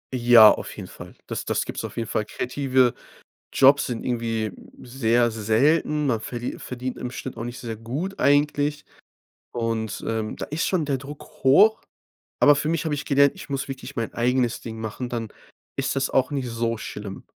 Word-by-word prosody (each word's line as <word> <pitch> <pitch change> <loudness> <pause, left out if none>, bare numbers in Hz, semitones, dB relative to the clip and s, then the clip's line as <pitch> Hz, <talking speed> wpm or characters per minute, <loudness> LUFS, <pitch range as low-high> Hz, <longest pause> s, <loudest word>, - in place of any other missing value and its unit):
Ja, 120 -3 +8
auf - - -4
jeden - - -7
Fall. - - -12
Das - - -5
das - - -1
gibt's - - -5
auf - - -7
jeden 115 -1 -2
Fall. 105 - -1
Kreative 130 +1 +1 0.6
Jobs 140 +1 +5
sind 120 -2 -4
irgendwie 115 -3 -1 0.3
sehr 120 -2 +1
selten. 145 +8 +2
Man 115 -5 +1
verli 120 +2 -5
verdient 125 0 -5
im 125 - -4
Schnitt 130 +1 -7
auch - - -5
nicht 120 +1 -6
sehr 115 -2 -5
gut 145 - -5
eigentlich 145 +1 +2 0.7
und, 115 -2 -3
ähm, 110 -1 -2
da - - -6
ist 155 +3 -2
schon 180 -5 +1
der 140 -2 0
Druck 140 +2 -9 0.2
hoch. 210 +12 +6 0.6
Aber 145 0 +7
für 150 +2 -1
mich 165 -1 -1
habe 155 -2 0
ich 145 - -4
gelernt, 140 0 +4
ich - - -11
muss 135 -1 -2
wirklich 135 0 -8
mein 115 -1 -2
eigenes 120 0 +1
Ding 110 -1 -7
machen, 110 +3 -5
dann 115 -2 -3 0.5
ist - - -1
das 135 - 0
auch 130 0 +1
nicht 135 -3 -2
so 115 0 -2
schlimm. 105 -2 -7
125 Hz, 185 wpm, -24 LUFS, 115-140 Hz, 0.7 s, Ja